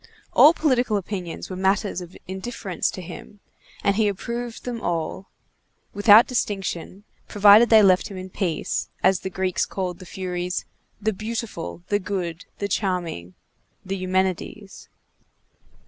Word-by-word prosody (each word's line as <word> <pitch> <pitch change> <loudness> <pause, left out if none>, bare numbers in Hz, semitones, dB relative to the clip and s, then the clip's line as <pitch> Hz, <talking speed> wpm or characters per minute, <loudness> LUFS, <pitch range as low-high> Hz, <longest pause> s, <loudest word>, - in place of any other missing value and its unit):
All 300 - +8
political 255 -9 +1
opinions 185 -3 -5
were - - -4
matters 195 0 0
of 175 0 -10
indifference 190 0 -3
to 185 - -7
him, 185 +4 -10 0.4
and 200 0 +2
he 220 -2 +3
approved 235 +4 -4
them 240 -2 -4
all, 170 +2 -3 0.6
without 205 +2 +7
distinction, 195 -5 -3 0.2
provided 210 +2 +7
they 220 -2 +7
left 185 -2 +4
him 195 - -8
in 185 0 -8
peace, 180 -5 -2
as 190 -2 +4
the 190 - -5
Greeks 190 -1 -1
called 180 -2 -4
the 185 - -11
Furies 180 -1 -3 0.3
"the 220 +1 0
beautiful, 215 -5 -5
the 205 - +2
good, 185 -4 -4
the 200 - -2
charming," 175 - -2 0.5
the 190 +1 -2
Eumenides. 190 +2 -2
195 Hz, 135 wpm, -24 LUFS, 180-210 Hz, 0.6 s, All